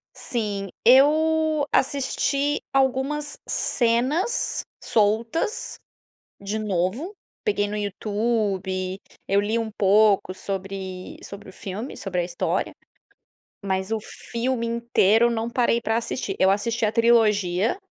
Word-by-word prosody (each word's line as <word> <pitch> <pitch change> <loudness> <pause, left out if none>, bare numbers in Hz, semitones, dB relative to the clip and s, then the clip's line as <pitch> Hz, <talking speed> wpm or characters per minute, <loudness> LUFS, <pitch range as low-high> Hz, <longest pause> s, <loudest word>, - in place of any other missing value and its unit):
Sim. 205 -5 -3 0.2
Eu 310 +4 +4
assisti 280 +1 +1
algumas 270 +3 0
cenas 255 - +1 0.2
soltas 230 - 0 0.6
de 200 +2 -3
novo. 210 - -2 0.3
Peguei 205 - +1
no 210 - -4
YouTube, 200 -3 -2 0.3
eu 200 +1 +3
li 215 +3 0
um 225 -1 -3
pouco 205 -2 +3
sobre 190 -1 -6
sobre 200 0 -10
o 185 - -13
filme 205 +7 -6
sobre 180 -3 -2
a - - -1
história, 175 0 -2 0.9
mas 190 +1 -2
o 225 - +1
filme 235 +2 -3
inteiro 235 -1 +3
não 225 0 -2
parei 235 -1 +2
para 225 -1 0
assistir. 230 -3 -3
Eu 190 - +5
assisti 220 +3 0
a - - +1
trilogia 220 - +3
220 Hz, 115 wpm, -24 LUFS, 195-250 Hz, 0.9 s, Eu